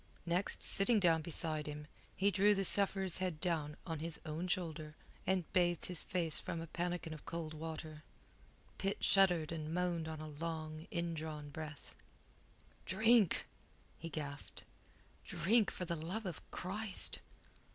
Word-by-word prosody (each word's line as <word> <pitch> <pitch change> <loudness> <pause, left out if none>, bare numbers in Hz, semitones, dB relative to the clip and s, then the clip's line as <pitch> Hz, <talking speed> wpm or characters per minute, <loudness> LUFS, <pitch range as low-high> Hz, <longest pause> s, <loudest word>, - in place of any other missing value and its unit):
Next, 175 +3 0
sitting 210 +3 +7
down 165 -4 +4
beside 155 -1 0
him, 150 0 -6 0.3
he 200 +1 +3
drew 205 +1 +4
the 195 0 0
sufferer's 195 -2 +4
head 185 -4 -2
down 155 -4 -1
on 165 -3 -4
his 165 +1 -2
own 160 +3 -3
shoulder, 160 -4 -3 0.3
and 190 -1 +2
bathed 175 -2 +2
his 180 -3 0
face 170 -4 +2
from 170 - -4
a 165 - -5
pannikin 175 0 -3
of 155 - -10
cold 165 -2 -4
water. 155 -1 -6 0.8
Pitt 195 +1 -2
shuddered 180 -5 +4
and 155 -2 -4
moaned 175 -2 -1
on 160 -1 -5
a 155 - -6
long, 155 +1 -5
indrawn 160 -5 -4
breath. 155 0 -8 0.9
"Drink!" 220 0 +4 0.5
he 165 - -6
gasped. 145 -3 -5 0.6
"Drink, 195 +6 +2
for 180 - -4
the 170 - -2
love 180 +8 -4
of 175 -5 -5
Christ!" 200 +2 0
170 Hz, 145 wpm, -36 LUFS, 155-185 Hz, 0.9 s, sitting